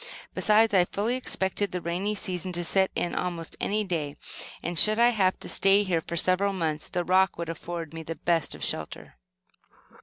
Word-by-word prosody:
Besides, 215 +1 +4
I 180 -2 +5
fully 210 +6 -2
expected 200 -5 0
the 180 - -2
rainy 180 +5 -2
season 185 -2 -2
to 175 0 0
set 190 +3 +2
in 175 - -1
almost 170 -2 -4
any 210 +1 0
day, 155 -7 -3 0.5
and 175 0 0
should 215 0 +6
I 235 +1 +6
have 195 -6 +1
to - - -6
stay 195 +1 +4
here 175 -4 0
for 170 - -6
several 185 +4 +2
months, 160 -4 -2
the 175 - -1
rock 185 +2 +3
would 170 -1 -4
afford 165 -1 -6
me 165 - -6
the 165 +1 -6
best 165 -3 0
of - - -8
shelter. - - -4
180 Hz, 190 wpm, -27 LUFS, 170-200 Hz, 0.5 s, should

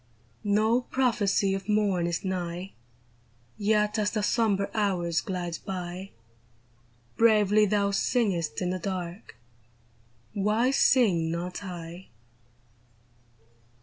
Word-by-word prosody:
^o 220 +4 +1
prophecy 215 -6 +1
of 195 +1 -5
morn 200 -5 +2
is 170 +2 -3
nigh; 180 0 -3 0.8
Yet 210 +1 +1
as 210 -1 +1
the 215 -1 -2
sombre 205 -3 +1
hours 180 -6 0
glide 175 -3 -4
by, 185 0 -5 1.1
Bravely 215 -2 +4
thou 200 0 +1
singest 190 -7 0
in 180 - -1
the 185 - -3
dark 180 0 -5 0.5
— 115 0 -35 0.2
Why 215 +5 +1
sing 200 -12 +3
not 175 +4 -4
I 175 -1 -8
195 Hz, 105 wpm, -27 LUFS, 175-210 Hz, 1.1 s, Bravely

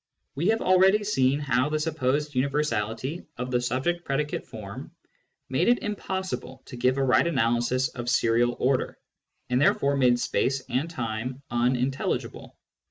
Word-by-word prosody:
We 160 +6 -1
have 225 +1 +2
already 190 +3 +4
seen 140 -9 +2
how 130 -1 +1
the 155 - 0
supposed 150 -2 -1
universality 135 0 -1
of 125 +1 -4
the 125 -1 +1
subject 130 +8 -1
predicate 150 +1 -2
form - - -8 0.6
made 130 +7 0
it 245 +1 +3
impossible 190 -9 -4
to - - -9
give 125 +2 +1
a 135 - +1
right 130 +5 +3
analysis 125 -2 +1
of 120 -1 -7
^frial 120 0 +2
order, 130 +1 0 0.5
and 125 +1 +2
therefore 140 -1 +3
made 125 -3 +3
space 130 +4 0
and 145 +6 -1
time 125 -2 -4
unintelligible. 125 +2 -1
130 Hz, 145 wpm, -26 LUFS, 125-150 Hz, 0.6 s, already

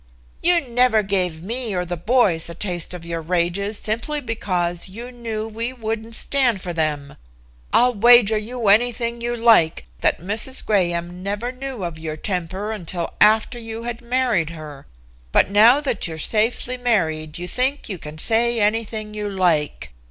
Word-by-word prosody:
"You 345 +1 +4
never 245 -4 +2
gave 180 -5 -1
me 230 0 -2
or 180 0 -1
the 175 0 -3
boys 180 -3 +1
a 170 - -7
taste 175 -2 -2
of 170 -2 -9
your 170 -1 -4
rages 180 +5 -1
simply 230 +8 -2
because 185 -8 -2
you 235 +6 -8
knew 225 -3 -5
we 230 +3 -3
wouldn't 225 -1 -4
stand 250 -7 +1
for 180 -1 -5
them. 150 -3 -2 0.5
I'll 250 +1 +4
wager 230 0 +6
you 225 +2 -3
anything 235 +2 +2
you 240 0 -2
like 220 - +4
that - - +1
Mrs. 215 - -1
Graham 175 -3 0
never 205 +5 -3
knew 260 -4 -6
of 170 -2 -5
your 155 -1 -5
temper 190 +3 -3
until 175 -4 -4
after 220 +3 +4
you 225 0 -7
had 240 0 -5
married 240 -9 0
her. 155 -4 -10 0.4
But 190 - +3
now 225 +7 +6
that 280 - -1
you're 160 -1 -6
safely 230 +7 0
married 160 -11 -1
you 175 +1 -5
think 260 +7 -1
you 190 -5 -5
can 150 0 -9
say 230 +6 +2
anything 215 0 -1
you 210 -1 -3
like. 170 - 0
210 Hz, 165 wpm, -21 LUFS, 175-235 Hz, 0.5 s, wager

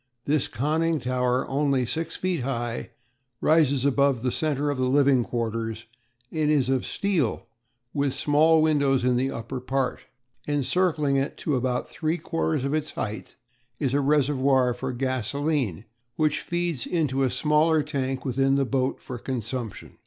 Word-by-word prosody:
This 150 -1 +1
conning 160 +4 0
tower, 125 0 0
only 135 -2 +1
six 165 +6 -3
feet 185 -3 -1
high, 120 -2 -3 0.5
rises 145 -4 +3
above 140 -3 +2
the 125 - +1
centre 145 -1 0
of 140 - -4
the 130 0 +1
living 135 -2 +4
quarters, 115 -1 -3 0.5
and 155 -2 0
is 140 -4 +2
of 130 -2 0
steel 180 - -1 0.5
with 140 -2 0
small 155 +2 +4
windows 140 -4 +2
in 125 0 +3
the 130 +2 +1
upper 115 +2 -5
part. 130 0 -1 0.5
Encircling 150 0 +1
it 135 +1 -2
to 150 - -1
about 125 0 -1
three 160 +1 -2
quarters 160 -5 -1
of 140 - -1
its 155 0 -2
height 110 0 -5 0.4
is 135 -4 0
a 145 - +3
reservoir 135 -3 +3
for 130 +2 -4
gasolene, 130 - -1 0.3
which 155 +1 +1
feeds 175 -6 -2
into 150 -6 0
a 130 - +3
smaller 150 +4 +2
tank 135 -3 -3
within 135 +1 +2
the 140 0 +2
boat 130 0 -1
for 125 -2 -7
consumption. 120 -3 -5
135 Hz, 155 wpm, -25 LUFS, 125-150 Hz, 0.5 s, living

